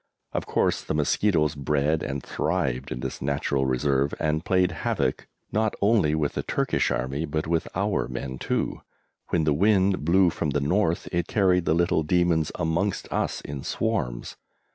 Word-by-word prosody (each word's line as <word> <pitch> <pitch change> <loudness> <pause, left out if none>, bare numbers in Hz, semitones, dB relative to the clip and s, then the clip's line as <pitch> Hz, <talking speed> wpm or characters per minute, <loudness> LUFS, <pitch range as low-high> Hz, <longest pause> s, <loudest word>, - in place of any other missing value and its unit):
Of - - -3
course - - +1
the - - -2
mosquitoes 75 0 +2
bred 75 +2 0
and 70 -1 -4
thrived 65 -8 -2
in - - -4
this - - -5
natural 70 0 0
reserve, 70 +2 +1
and 80 0 0
played 90 -1 +2
havoc, 80 - -1 0.2
not 110 0 +1
only 100 -8 +3
with 75 -2 0
the - - -2
Turkish - - 0
Army, 65 +5 -2
but 80 0 -2
with 80 0 0
our 100 -3 0
men 65 +1 -5
too; - - -2 0.5
when 85 - +1
the 75 -1 +2
wind 95 +1 +3
blew 90 +2 +4
from 80 - -2
the 70 +1 0
north 85 +4 +1
it 85 -1 -1
carried 90 -4 +2
the 80 - +2
little 85 -1 +2
demons 85 -1 +2
amongst 85 +5 -1
us - - -1
in 70 -2 -6
swarms. 90 - -2
80 Hz, 165 wpm, -25 LUFS, 70-90 Hz, 0.5 s, blew